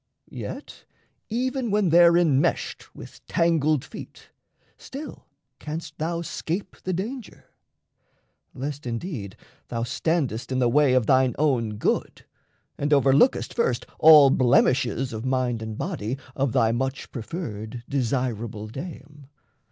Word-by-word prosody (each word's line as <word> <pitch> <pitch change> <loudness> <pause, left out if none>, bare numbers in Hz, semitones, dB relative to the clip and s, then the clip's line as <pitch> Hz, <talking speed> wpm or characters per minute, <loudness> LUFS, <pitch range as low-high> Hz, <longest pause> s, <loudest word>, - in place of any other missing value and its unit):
Yet - - -8 0.4
even 255 +2 -1
when 205 -3 +2
there 170 +1 +6
enmeshed 150 -5 0
with - - -12
tangled 155 -4 +2
feet, - - -11 0.4
Still 285 +3 -9 0.3
canst 155 0 -7
thou 170 +2 -2
scape 180 +3 -4
the 185 - -3
danger 215 +6 -5 1.1
lest 140 0 -5
indeed 115 - -5 0.3
Thou 115 -1 -3
standest 130 -2 -1
in 130 - 0
the 125 -2 +3
way 145 +1 +4
of 125 -3 +3
thine 130 -1 +3
own 120 -8 +1
good, - - -2 0.5
And 145 - 0
overlookest 140 - +4
first 180 - 0
all 150 -3 +8
blemishes 125 0 +2
Of 110 0 -5
mind 130 -3 0
and 110 -1 -6
body 110 +6 -3 0.2
of 135 -2 0
thy 110 0 +3
much 130 +3 -3
preferred, 115 - -6
Desirable 120 -5 -2
dame. 145 +1 -9
135 Hz, 120 wpm, -25 LUFS, 120-165 Hz, 1.1 s, all